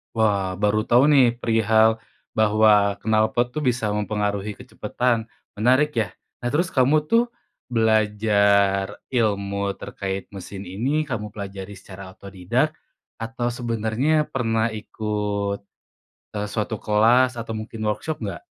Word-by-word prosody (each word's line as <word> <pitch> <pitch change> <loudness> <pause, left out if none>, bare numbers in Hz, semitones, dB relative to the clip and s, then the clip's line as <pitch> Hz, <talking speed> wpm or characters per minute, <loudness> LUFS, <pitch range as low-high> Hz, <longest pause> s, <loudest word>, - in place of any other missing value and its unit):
Wah, 100 -4 +1
baru 105 +1 +2
tau 125 +5 +5
nih 130 -5 +5
perihal 110 0 +3 0.4
bahwa 105 -1 +4
knalpot 110 +3 +2
tuh 150 +3 -4
bisa 120 -3 +1
mempengaruhi 105 0 -2
kecepatan, 120 0 -2 0.3
menarik 130 +7 +3
ya. 110 -5 0 0.2
Nah 120 +2 -4
terus 170 +3 +1
kamu 140 +4 +3
tuh 230 +1 +5 0.4
belajar 105 -3 +2 0.2
ilmu 100 -4 0
terkait 95 -1 -5
mesin 95 0 -8
ini, 130 +11 0
kamu 105 -4 -4
pelajari 100 -1 -7
secara 95 0 -11
otodidak, 95 -2 -2 0.4
atau 115 +1 -3
sebenernya 120 +5 0
pernah 115 -3 0
ikut, 105 -2 -3 0.7
eee, 105 0 -3
suatu 105 0 -3
kelas 120 +4 +3
atau 115 -1 -5
mungkin 110 0 -6
workshop 110 +6 -2
nggak? 100 -6 -6
110 Hz, 120 wpm, -23 LUFS, 100-120 Hz, 0.7 s, tau